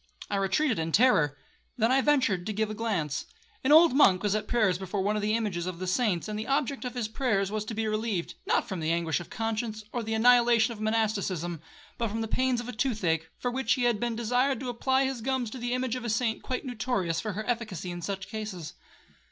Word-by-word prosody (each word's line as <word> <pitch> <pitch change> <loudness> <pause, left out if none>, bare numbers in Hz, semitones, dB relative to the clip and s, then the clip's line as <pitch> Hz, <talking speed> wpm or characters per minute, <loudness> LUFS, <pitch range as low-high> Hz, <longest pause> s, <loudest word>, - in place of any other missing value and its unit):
I 200 - +1
retreated 195 - +1
in 165 0 -2
terror;—then 220 - +1
I 270 +1 +4
ventured 255 -11 +2
to 215 - -2
give 215 +1 -1
a - - -3
glance. 200 -10 -2 0.4
An 265 - +2
old 320 -1 +8
monk 195 -9 +5
was 205 -1 +1
at 215 0 -1
prayers 210 -7 +2
before 190 +1 -2
one 210 +2 +1
of 210 - -1
the 215 +1 +1
images 195 -6 -2
of 185 -2 -4
the 185 - -4
saints, 185 -2 0
and 210 0 -4
the 220 - -5
object 275 -1 0
of 250 - -5
his 240 -3 -1
prayers 215 -5 0
was 215 -1 -2
to 220 - -5
be 220 +1 -1
relieved, 215 -6 -2
not - - +2
from 190 - -4
the 160 0 -1
anguish 165 -1 0
of 175 - -9
conscience, 220 -1 -3
or 240 - -1
the 220 0 -2
annihilation 235 0 +5
of 215 - -10
monasticism, 200 -7 -1 0.4
but 230 - +1
from 220 +2 -3
the 225 - -2
pains 255 +1 +1
of 240 - -6
a - - -3
toothache, 185 - 0
for 245 - -2
which 240 -3 +1
he 250 - -1
had 240 -3 +2
been 240 0 -1
desired 245 +3 +1
to 255 - -3
apply 260 +3 +1
his 265 -3 -3
gums 255 -2 -1
to 260 - -7
the 240 0 -3
image 255 -1 -1
of 250 - -5
a 235 - -3
saint 225 0 0
quite 255 +2 -4
notorious 220 -9 -1
for 215 -2 -3
her 215 +3 -4
efficacy 215 -7 -3
in 175 0 -6
such 195 +1 -4
cases. 210 -7 -6
220 Hz, 235 wpm, -28 LUFS, 195-245 Hz, 0.4 s, old